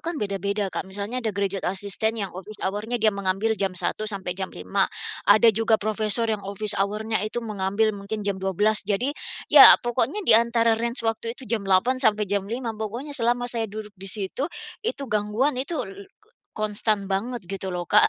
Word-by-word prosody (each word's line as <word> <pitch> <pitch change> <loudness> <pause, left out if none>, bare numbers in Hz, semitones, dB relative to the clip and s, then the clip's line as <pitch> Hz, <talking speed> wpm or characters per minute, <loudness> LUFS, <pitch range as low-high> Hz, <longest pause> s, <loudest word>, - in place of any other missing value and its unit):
kan 330 0 -4
beda-beda 200 -1 -2
Kak. - - -2
Misalnya 205 +6 -4
ada 230 - -1
graduate 200 -1 -2
assistant 205 +3 -1
yang 190 - -7
office 195 +4 -6
hour-nya 210 +5 -2
dia 215 -1 +3
mengambil 200 +3 0
jam 195 -3 -2
1 215 +4 -1
sampai 195 -3 -3
jam 190 +1 -4
5. 90 +1 -1 0.4
Ada 215 +2 +7
juga 225 +1 +2
profesor 215 +1 0
yang 215 -2 -1
office 200 +1 -1
hour-nya 210 +3 -1
itu 215 +3 -3
mengambil 210 +1 0
mungkin 205 +1 -6
jam 200 -1 -1
12 205 +3 +2
jadi, 210 +7 -1 0.4
ya - - +11
pokoknya 250 - -1
di - - +7
antara 230 0 +5
range 235 +2 -1
waktu 230 +1 -2
itu 265 - -10
jam 215 -4 -3
8 240 +8 +2
sampai 215 -4 +2
jam 200 0 -2
5 235 0 -3
pokoknya 225 +7 -6
selama 245 -2 0
saya 235 -2 -2
duduk 210 0 -8
di 195 -1 -1
situ, 210 - +1 0.3
itu 425 -11 -2
gangguan 215 +4 0
itu, 270 - -5
l 195 +1 -10 0.2
k 430 - -27 0.3
konstan 210 -1 0
banget 235 +5 -2
gitu 195 +1 -5
loh 175 0 -3
Kak. - - +5
215 Hz, 190 wpm, -24 LUFS, 200-230 Hz, 0.4 s, ya